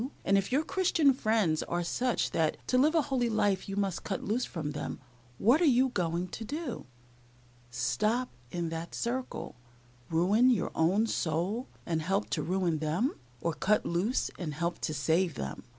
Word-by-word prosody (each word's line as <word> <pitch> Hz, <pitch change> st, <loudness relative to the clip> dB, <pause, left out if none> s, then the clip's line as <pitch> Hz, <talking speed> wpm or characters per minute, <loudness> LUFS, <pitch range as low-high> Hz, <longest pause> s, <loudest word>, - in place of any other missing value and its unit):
and, 195 Hz, -, +4 dB
if 195 Hz, +3 st, +1 dB
your 280 Hz, +4 st, +3 dB
Christian 330 Hz, -6 st, +3 dB
friends 215 Hz, -10 st, +1 dB
are 175 Hz, 0 st, -2 dB
such 245 Hz, +8 st, 0 dB
that 160 Hz, -1 st, +1 dB
to -, -, +1 dB
live 305 Hz, +5 st, +4 dB
a 320 Hz, -, +4 dB
holy 255 Hz, -4 st, 0 dB
life 205 Hz, -4 st, +1 dB
you 195 Hz, -, -3 dB
must 195 Hz, -3 st, -1 dB
cut 195 Hz, -, -3 dB
loose 230 Hz, +5 st, 0 dB
from 150 Hz, -4 st, -4 dB
them, 145 Hz, -, -5 dB, 0.4 s
what 250 Hz, -, +4 dB
are -, -, +5 dB
you 260 Hz, -2 st, +4 dB
going 175 Hz, -4 st, -1 dB
to 225 Hz, -, -6 dB
do 285 Hz, -, -5 dB, 0.8 s
stop 210 Hz, -, 0 dB, 0.2 s
in 170 Hz, +1 st, -2 dB
that 165 Hz, +1 st, -5 dB
circle, 250 Hz, +2 st, -3 dB, 0.5 s
ruin 195 Hz, +10 st, +4 dB
your 235 Hz, -7 st, +1 dB
own 190 Hz, +7 st, +3 dB
soul, 185 Hz, -, -1 dB, 0.2 s
and 160 Hz, -2 st, -1 dB
help 195 Hz, +6 st, -1 dB
to -, -, 0 dB
ruin 180 Hz, -3 st, 0 dB
them, 160 Hz, -, 0 dB, 0.3 s
or 170 Hz, -, 0 dB
cut 210 Hz, +6 st, +1 dB
loose 185 Hz, +9 st, 0 dB
and 155 Hz, -5 st, -4 dB
help 170 Hz, +2 st, -2 dB
to -, -, -2 dB
save 160 Hz, +4 st, +1 dB
them?" 70 Hz, -1 st, -5 dB
195 Hz, 175 wpm, -30 LUFS, 165-245 Hz, 0.8 s, are